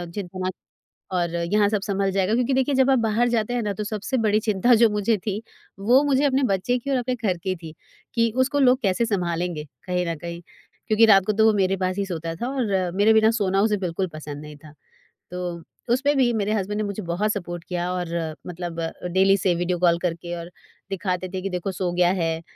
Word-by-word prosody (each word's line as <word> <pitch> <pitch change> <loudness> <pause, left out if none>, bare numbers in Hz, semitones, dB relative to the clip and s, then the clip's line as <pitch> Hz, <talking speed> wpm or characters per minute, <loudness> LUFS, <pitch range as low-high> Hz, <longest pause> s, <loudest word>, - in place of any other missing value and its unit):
चिंता 185 -2 -6
मत 185 - -1 0.6
और 175 -2 0
यहाँ 200 +5 +2
सब 210 -2 0
संभल 195 -1 -1
जाएगा। 195 +2 +1
क्योंकि 250 +3 +1
देखिए 265 +2 +1
जब 265 0 +4
आप 265 - +4
बाहर 225 +1 +2
जाते 235 0 0
हैं 245 - 0
ना 205 -2 -2
तो 210 - -4
सबसे 215 +5 -3
बड़ी 215 -2 +2
चिंता 215 +2 +2
जो 230 0 +5
मुझे 210 +1 +1
थी 210 0 -2 0.4
वो 240 +7 +5
मुझे 280 -1 +2
अपने 275 0 +2
बच्चे 195 +7 0
की 280 - -7
और 270 - +2
अपने 250 0 -1
घर 205 -7 -1
की 185 +2 -3
थी। 165 -3 -10 0.4
कि 230 -1 +2
उसको 265 +3 +1
लोग 255 -2 +5
कैसे 200 +1 +1
संभालेंगे 175 -6 -2 0.2
कहीं 180 -1 -1
न 165 - -1
कहीं? 170 +1 -7 0.5
क्योंकि 220 +1 +5
रात 195 -4 +6
को 215 - +2
तो 220 +1 +3
वो 220 - +5
मेरे 190 0 +2
पास 185 0 -1
ही 200 - 0
सोता 165 -3 -4
था 235 +9 -4
और 195 -8 0
मेरे 205 +3 +5
बिना 220 0 +5
सोना 195 -4 +1
उसे 210 0 +2
बिल्कुल 185 0 -2
पसंद 150 -1 -7
नहीं 150 0 -10
था। 155 -2 -13 0.6
तो 180 -1 -4 0.3
उसमें 280 +4 +2
भी 250 -3 +4
मेरे 210 -1 0
हस्बैंड 205 0 -2
ने - - 0
मुझे 200 0 -4
बहुत 180 +5 0
सपोर्ट 175 -4 -5
किया 175 0 -3
और 180 -1 -2 0.4
मतलब 175 -1 -5 0.3
डेली 190 +1 +5
से 190 -2 +1
वीडियो 175 +1 -1
कॉल 170 -1 +4
करके 170 0 -3
और 170 0 -7 0.4
दिखाते 185 -1 -2
थे 190 - -3
कि 195 - -3
देखो 180 +1 -3
सो 180 -1 -2
गया 175 0 +3
है। 165 -3 -1
195 Hz, 225 wpm, -24 LUFS, 175-220 Hz, 0.6 s, रात